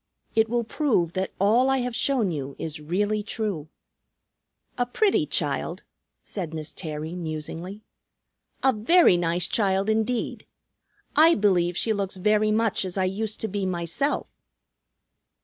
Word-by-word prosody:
"It 220 0 +3
will 240 0 +1
prove 220 - 0
that 190 0 -2
all 230 +7 +4
I 270 - +3
have 245 -1 -3
shown 240 -9 +1
you 140 -3 -5
is 155 -1 -5
really 205 +7 0
true." 205 -8 -3 1.1
"A 245 - +1
pretty 400 - +2
child," - - -1 0.4
said 170 -6 -5
Miss 155 -1 -5
Terry 155 -1 -5
musingly. 170 +4 -6 0.8
"A 265 -1 +5
very 240 - +5
nice 175 0 0
child 195 -1 +1
indeed. 220 +2 -1 0.7
I 325 +3 +7
believe 180 -4 +2
she 225 - +1
looks 195 -2 -3
very 210 +3 +2
much 220 -1 +1
as 185 0 -4
I 190 - +2
used 210 +3 -3
to 220 - 0
be 205 0 -3
myself." 175 - -1
200 Hz, 140 wpm, -25 LUFS, 175-225 Hz, 1.1 s, I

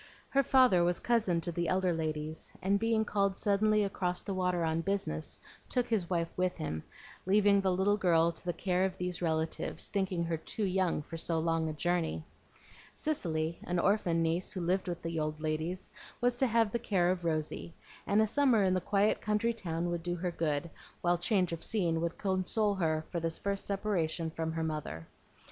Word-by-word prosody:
Her 275 - +3
father 255 -9 +5
was 175 0 +2
cousin 215 -8 +1
to 175 - -2
the 170 0 -1
elder 185 0 +2
ladies, 155 -1 -4
and 195 +2 +1
being 225 0 +2
called 200 -2 +1
suddenly 210 +1 +2
across 180 -2 -2
the 200 - -3
water 180 -2 0
on 160 0 0
business, 175 - -2 0.3
took 250 -1 +2
his 215 -8 -1
wife 170 -2 -1
with 180 0 0
him, 80 0 -3 0.5
leaving 200 0 +5
the 190 -1 +2
little 190 +3 +2
girl 170 -3 +3
to 165 - -5
the 175 - +1
care 180 +2 0
of 190 -1 -1
these 180 -1 -3
relatives, 160 -1 -1
thinking 190 -4 -1
her 165 -1 -1
too 185 +7 -4
young 185 -5 +1
for 165 - -7
so 165 0 -1
long 165 0 +1
a - - -3
journey. 170 0 -1 0.7
Cicely, 165 - -2
an 180 - -1
orphan 175 -3 +2
niece 165 +3 0
who 185 - -3
lived 185 +3 0
with 175 -1 -4
the 165 -1 -2
old 155 0 -2
ladies, 155 +4 -3 0.3
was 245 0 +2
to 265 - +3
have 230 -2 +2
the 235 - -1
care 185 -6 +2
of 180 -1 -3
Rosy; 160 0 -2 0.3
and 210 +2 +4
a - - +3
summer 240 -2 +3
in 185 -1 +3
the 185 - +1
quiet 200 +3 +2
country 215 +2 +1
town 175 -5 -3
would 170 -1 -2
do 175 +1 -2
her 180 +1 -2
good, 160 -1 -1 0.3
while 175 0 +2
change 180 -1 +2
of 165 - -4
scene 170 -7 +1
would 170 0 -2
console 200 +2 0
her 160 -4 0
for 170 - -1
this 165 0 -1
first 200 -1 -2
separation 175 -5 -1
from 160 0 -3
her 165 0 -2
mother. 150 - -4
180 Hz, 200 wpm, -32 LUFS, 165-200 Hz, 0.7 s, father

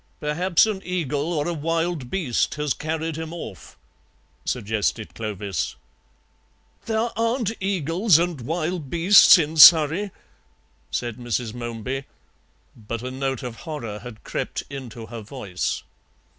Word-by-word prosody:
"Perhaps 170 +5 +2
an 210 -3 -3
eagle 160 -3 -2
or 150 -2 -1
a 175 - -1
wild 165 -3 -2
beast 155 -10 0
has 150 -3 0
carried 160 0 -3
him 160 0 -5
off," 115 - -9 0.7
suggested 110 -1 -1
Clovis. 100 -6 -3 1.1
"There 225 +1 0
aren't 230 -1 0
eagles 185 0 +2
and 170 -5 -1
wild 160 +2 -3
beasts 175 +5 +8
in 160 -1 -1
Surrey," 160 +5 +8 0.8
said 120 -2 -3
Mrs. 120 -2 -3
Momeby, 120 +3 -4 0.7
but 115 +1 -6
a 130 - -4
note 135 -1 -3
of 120 -2 -6
horror 120 -10 -6
had 120 -2 -11
crept - - -4
into 120 -5 -7
her 115 0 -8
voice. 105 -5 -4
150 Hz, 125 wpm, -23 LUFS, 120-170 Hz, 1.1 s, beasts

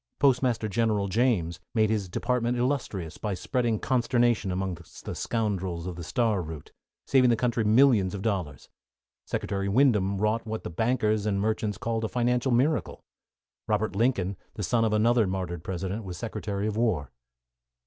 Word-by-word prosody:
Postmaster 125 -5 +2
General 105 -1 +1
James 95 -6 +1 0.2
made 110 -1 +3
his 100 -4 -1
department 120 +4 0
illustrious 120 - -2
by 105 -3 -2
spreading 120 +2 0
consternation 120 -4 +1
among 95 0 -2 0.3
the - - -5
scoundrels 95 -7 -2
of 90 -1 -4
the 85 - -7
Star 110 +1 +1
Route, 80 -3 -8 0.3
saving 130 -2 +4
the 120 - +4
country 115 0 0
millions 110 -4 +4
of 100 - -6
dollars. 90 - -2 0.6
Secretary 100 -1 -2
Windom 105 -5 +3
wrought 110 +3 0
what 110 0 -4
the - - -5
bankers 110 +1 +1
and 100 -2 +1
merchants 110 -1 -1
called 115 +2 -2
a 110 - -1
financial 125 +1 +1
miracle. 135 +6 +1 0.6
Robert 105 -2 0
Lincoln, 100 -5 +1 0.2
the 105 - -4
son 115 +4 +2
of 110 - +2
another 110 +1 +3
martyred 90 -3 -3
President, 95 +4 -4
was 90 -3 -6
Secretary 105 -1 -3
of 105 -1 -1
War. 100 - 0
110 Hz, 160 wpm, -27 LUFS, 95-120 Hz, 0.6 s, saving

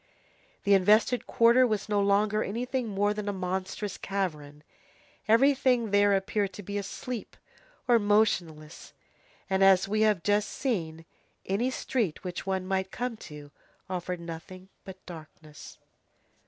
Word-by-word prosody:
The 200 - +3
invested 210 +6 +3
quarter 235 +2 +5
was 215 -3 -2
no 205 -1 +1
longer 205 +2 +2
anything 245 +3 -3
more 205 0 0
than 210 -1 -4
a - - 0
monstrous 190 +1 -4
cavern; 150 -7 -4 0.6
everything 250 -1 +3
there 205 0 +4
appeared 195 0 -1
to 205 - -9
be 205 +2 -4
asleep 210 +3 -6 0.5
or 240 -2 +5
motionless, 180 -7 0 0.5
and, 190 0 +1
as 195 0 +5
we 215 +2 0
have 210 -5 +2
just 205 0 +1
seen, 165 - -3 0.4
any 210 +7 0
street 230 -10 -2
which 180 0 -6
one 190 -1 -1
might 190 0 -1
come 245 +2 -4
to 150 -6 -11 0.4
offered 180 -1 -3
nothing 170 +3 -9 0.2
but 190 -1 -11
darkness. 155 -3 -12
200 Hz, 135 wpm, -28 LUFS, 185-215 Hz, 0.6 s, quarter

